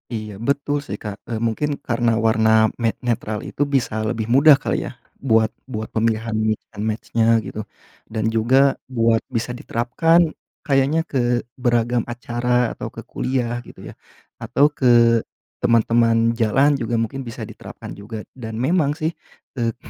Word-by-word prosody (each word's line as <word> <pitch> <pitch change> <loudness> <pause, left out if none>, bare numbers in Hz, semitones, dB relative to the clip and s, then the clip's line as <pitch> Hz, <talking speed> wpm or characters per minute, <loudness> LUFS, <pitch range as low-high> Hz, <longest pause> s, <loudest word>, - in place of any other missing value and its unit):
Iya, 105 -2 -6
betul, 140 +1 0
sih, - - -4
Kak. 105 -1 -6
Eee, 115 - -3
mungkin 145 +6 -1
karena 120 -1 +1
warna 110 -1 +3
ne 115 -2 0
netral 110 -3 -2
itu - - -7
bisa 135 -6 0
lebih 110 -1 -2
mudah 145 +2 +8
kali, - - -2
ya, - - -9 0.2
buat 110 -4 +2 0.2
buat 110 -4 -5
pemilihan 115 0 0 0.2
mix 110 -1 -1
and 105 -2 -6
match-nya, 110 +1 -1 0.2
gitu, 105 +1 -6 0.4
dan 110 0 -1
juga 130 +5 +3
buat 115 -3 +2
bisa 115 +1 -3
diterapkan 150 +7 +2 0.3
kayaknya 140 +3 +2
ke 120 -2 +1 0.2
beragam 120 -1 +1
acara 120 0 0
atau - - -6
ke - - -9
kuliah, 120 -2 -2
gitu, - - -13
ya? - - -14 0.5
Atau, 145 +2 +2
ke 135 -3 0 0.7
teman-teman 115 0 +3
jalan 135 +6 +3
juga 120 -1 -2
mungkin 115 +3 -2
bisa 115 0 -6
diterapkan 110 - -10
juga, 105 +1 -8
dan 110 -3 -7
memang, 145 +4 +1
sih, 160 0 -1 0.5
e 115 -1 0
120 Hz, 150 wpm, -21 LUFS, 110-135 Hz, 0.7 s, mudah